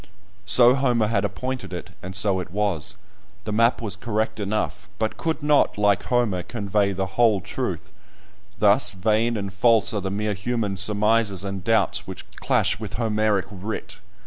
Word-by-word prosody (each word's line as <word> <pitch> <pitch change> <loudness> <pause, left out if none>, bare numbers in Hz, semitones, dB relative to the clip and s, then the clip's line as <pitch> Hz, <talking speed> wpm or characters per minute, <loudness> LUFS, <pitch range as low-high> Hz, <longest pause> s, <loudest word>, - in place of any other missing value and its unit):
So 120 +4 +6
Homer 125 -4 +2
had 105 -3 +1
appointed 125 +6 -4
it, - - -7
and 95 +1 -6
so 100 -2 +1
it 90 - -6
was; 100 -1 0 0.5
the 105 - -4
map 115 +3 +2
was 105 -3 -3
correct 110 +1 -2
enough, 105 +1 -3
but 110 -1 -1
could 160 -2 -3
not, 150 -6 +3
like 105 -1 +2
Homer, 120 -7 +1
convey 100 0 -1
the 95 0 -2
whole 105 +2 +2
truth. - - -5 0.7
Thus - - +4
vain 110 +4 +1
and 100 -2 -5
false 115 +2 +3
are 105 - -1
the 95 - -3
mere 105 +2 -1
human 105 0 -2
surmises 105 -1 +1
and 95 -2 -5
doubts 115 +2 +1
which - - -8
clash - - +1
with 105 -3 -7
Homeric 110 -3 +1
writ! 100 +2 -6
105 Hz, 165 wpm, -23 LUFS, 100-115 Hz, 0.7 s, So